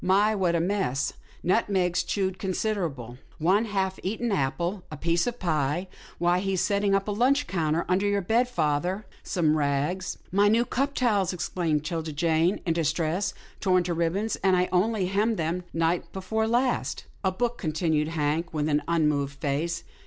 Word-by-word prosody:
" -, -, -13 dB
My, 210 Hz, +2 st, +3 dB
what 185 Hz, -4 st, +1 dB
a -, -, +2 dB
mess. 175 Hz, -7 st, 0 dB, 0.3 s
Nutmegs 185 Hz, -2 st, +2 dB
chewed 190 Hz, -2 st, -2 dB
considerable, 170 Hz, -, -2 dB, 0.2 s
one 185 Hz, +7 st, +3 dB
apple 205 Hz, -, -8 dB
half 190 Hz, -1 st, 0 dB
eaten, 225 Hz, +4 st, -2 dB
a 170 Hz, +2 st, -2 dB
piece 170 Hz, +3 st, +1 dB
of 245 Hz, 0 st, -2 dB
pie 160 Hz, -, 0 dB, 0.2 s
— -, -, -20 dB
why, 175 Hz, +1 st, +2 dB
he's 190 Hz, -1 st, -1 dB
set 200 Hz, -1 st, +1 dB
ting 200 Hz, -1 st, +2 dB
up 195 Hz, +1 st, 0 dB
a -, -, 0 dB
lunch 260 Hz, +7 st, +2 dB
counter 165 Hz, -2 st, 0 dB
under 185 Hz, +3 st, +2 dB
your 200 Hz, -1 st, +1 dB
bed, 235 Hz, +6 st, +2 dB
father 175 Hz, +1 st, -1 dB
— -, -, -27 dB
some 155 Hz, -4 st, +1 dB
rags 150 Hz, +5 st, -1 dB
— -, -, -33 dB
" -, -, -29 dB
" -, -, -28 dB
My 200 Hz, +2 st, +4 dB
new 230 Hz, +3 st, +3 dB
cup 275 Hz, +4 st, -1 dB
towels," 205 Hz, -8 st, +2 dB
exclaimed 165 Hz, -4 st, -1 dB
'Tilda 160 Hz, -1 st, -3 dB
Jane, 165 Hz, +4 st, +1 dB
in 165 Hz, -, +2 dB
distress, 165 Hz, +3 st, 0 dB
" -, -, -26 dB
torn 185 Hz, -2 st, +3 dB
to 175 Hz, 0 st, -2 dB
ribbons, 170 Hz, +6 st, 0 dB
and 190 Hz, -1 st, +3 dB
I 180 Hz, 0 st, +1 dB
only 195 Hz, +2 st, +2 dB
hemmed 210 Hz, +4 st, +1 dB
them 170 Hz, +2 st, -2 dB
night 165 Hz, +1 st, 0 dB
before 220 Hz, +4 st, -1 dB
last." 245 Hz, +2 st, 0 dB
" -, -, -32 dB
A 190 Hz, -, +2 dB
book," 240 Hz, +5 st, -2 dB
continued 155 Hz, -2 st, 0 dB
Hank 160 Hz, +1 st, -1 dB
with 150 Hz, 0 st, 0 dB
an 150 Hz, 0 st, +2 dB
unmoved 150 Hz, -4 st, +1 dB
face. 160 Hz, +5 st, -1 dB
180 Hz, 195 wpm, -27 LUFS, 160-200 Hz, 0.3 s, My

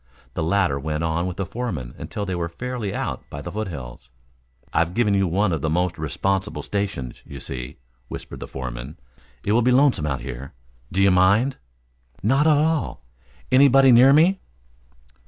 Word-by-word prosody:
The -, -, -3 dB
latter 80 Hz, -4 st, +1 dB
went 75 Hz, +2 st, -2 dB
on 85 Hz, +2 st, 0 dB
with 90 Hz, -, -5 dB
the 95 Hz, -, -2 dB
foreman 85 Hz, -, -4 dB
until 105 Hz, -, -5 dB
they 95 Hz, -, -3 dB
were 85 Hz, -1 st, -2 dB
fairly 120 Hz, +3 st, -4 dB
out -, -, -3 dB
by 70 Hz, -, -7 dB
the 70 Hz, -, -6 dB
foothills. 70 Hz, -, -6 dB, 0.6 s
"I've 85 Hz, +2 st, +1 dB
given 115 Hz, -4 st, +2 dB
you 95 Hz, -1 st, +2 dB
one 95 Hz, +4 st, +1 dB
of 80 Hz, -, -2 dB
the 80 Hz, -, 0 dB
most 90 Hz, +1 st, 0 dB
responsible 95 Hz, +7 st, -1 dB
stations, 100 Hz, -12 st, -3 dB
you -, -, -9 dB
see," 60 Hz, -1 st, -6 dB, 0.3 s
whispered -, -, -8 dB
the -, -, -7 dB
foreman. 65 Hz, +3 st, -6 dB, 0.5 s
"It 100 Hz, -, 0 dB
will 115 Hz, +3 st, +4 dB
be 125 Hz, -, +3 dB
lonesome 125 Hz, -, +3 dB
out 65 Hz, -2 st, -2 dB
here. 65 Hz, +1 st, -7 dB, 0.4 s
Do 95 Hz, +2 st, +2 dB
you 100 Hz, -, +5 dB
mind?" 100 Hz, +9 st, +3 dB, 0.7 s
"Not 135 Hz, +8 st, +3 dB
at 155 Hz, -2 st, +5 dB
all. 155 Hz, -, 0 dB, 0.5 s
Anybody 135 Hz, 0 st, +6 dB
near 125 Hz, +3 st, +8 dB
me?" 170 Hz, +7 st, +5 dB
95 Hz, 175 wpm, -23 LUFS, 75-120 Hz, 0.7 s, near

